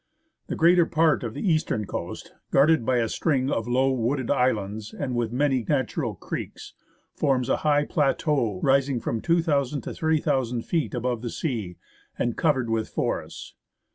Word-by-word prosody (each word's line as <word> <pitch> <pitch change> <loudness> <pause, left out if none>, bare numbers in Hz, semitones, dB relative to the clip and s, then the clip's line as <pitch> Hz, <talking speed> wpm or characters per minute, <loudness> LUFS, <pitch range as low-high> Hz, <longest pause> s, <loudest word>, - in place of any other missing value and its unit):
The - - -3
greater 170 0 +5
part 160 -3 +2
of 115 -2 -5
the - - -3
eastern 155 - +1
coast, - - -6 0.2
guarded 150 0 +4
by 130 - +3
a 115 -1 +1
string 135 0 0
of 115 0 -1
low, 130 +2 +2
wooded 130 +1 -1
islands 110 -5 -1
and 135 -3 -3
with 120 -2 -1
many 130 -1 +1
natural 130 -5 -1
creeks, - - -7 0.4
forms 135 -3 0
a - - +2
highland 145 -1 +1
plateau 135 - +1
rising 135 -1 +2
from 115 -1 -3
2,000 150 -5 +1
to - - -6
3,000 130 -7 0
feet 160 -6 -1
above 120 -1 -2
the 120 - -4
sea 110 - -4 0.4
and 120 -1 -1
covered 130 -7 +1
with 110 -1 -1
forests. - - -4
130 Hz, 160 wpm, -25 LUFS, 120-150 Hz, 0.4 s, greater